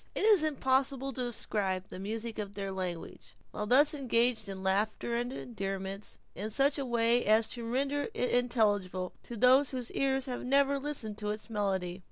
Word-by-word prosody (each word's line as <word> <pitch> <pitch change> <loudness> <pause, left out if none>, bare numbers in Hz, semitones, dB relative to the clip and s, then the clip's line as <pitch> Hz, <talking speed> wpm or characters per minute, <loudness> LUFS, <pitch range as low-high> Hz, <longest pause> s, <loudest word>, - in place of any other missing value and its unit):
It - - 0
is 425 -6 +6
impossible 270 -2 +1
to 255 - -4
describe 195 -5 -2
the - - -7
music 220 +3 -4
of 200 -1 -5
their 195 -1 -3
language, 180 -3 -6 0.2
while 210 - -4
thus 285 +6 +5
engaged 240 -5 +1
in 190 -1 -6
laughter 210 +4 0
and 240 +1 -1
endearments, 195 -5 -5 0.2
in 205 +4 -4
such 275 +6 +2
a 275 - -2
way 235 0 +3
as 220 +1 +4
to 240 - -5
render 280 +3 0
it 250 - 0
intelligible 205 -7 +1
to 235 - -8
those 255 +4 +5
whose 250 -3 -4
ears 270 -1 +1
have 250 -2 -4
never 275 +2 +3
listened 260 -7 -3
to 210 -1 -3
its 215 +2 -5
melody. 190 -4 -1
235 Hz, 180 wpm, -31 LUFS, 200-265 Hz, 0.2 s, is